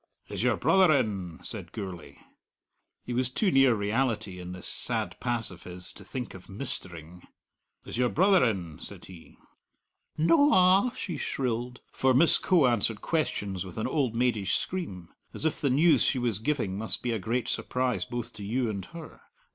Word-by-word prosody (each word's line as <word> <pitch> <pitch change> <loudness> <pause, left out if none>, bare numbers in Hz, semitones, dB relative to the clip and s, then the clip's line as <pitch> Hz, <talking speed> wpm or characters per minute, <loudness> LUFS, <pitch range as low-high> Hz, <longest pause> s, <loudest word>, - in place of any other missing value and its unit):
"Is - - -3
your - - +2
brother 190 -3 +4
in?" 95 -9 -2
said 95 -6 -6
Gourlay. 95 -6 -7 0.9
He 125 - -4
was 125 +1 +1
too 190 - +1
near 135 -4 +5
reality 105 -2 -1
in 90 0 -7
this 90 0 -7
sad - - -1
pass 120 -2 -2
of - - -12
his 90 0 -8
to - - -12
think 125 -3 -6
of 95 - -13
"mistering." 90 - -6 0.6
"Is - - -5
your 125 -1 +3
brother 190 +2 +4
in?" 90 -10 -2
said - - -7
he. 90 -4 -14 0.8
"No 165 - +4
a!" 185 +6 +5
she 175 - -4
shrilled 125 -1 -3
for 130 -1 +2
Miss 160 +6 +6
Coe 175 -7 +3
answered 115 -3 +2
questions 100 - -1
with 95 -3 -10
an 110 - -1
old 130 -7 0
maidish 115 -6 +1
scream, 95 - -4 0.3
as - - -2
if 160 - 0
the 140 - +2
news 155 +6 +4
she 135 - +2
was 120 -5 0
giving 110 -6 -1
must 110 - -2
be 120 - 0
a 115 - -1
great 115 +6 -2
surprise 125 -1 -1
both 120 -1 -5
to 105 - -9
you 115 +3 -1
and 100 -3 -5
her. 170 -1 -11
120 Hz, 180 wpm, -28 LUFS, 95-140 Hz, 0.9 s, Miss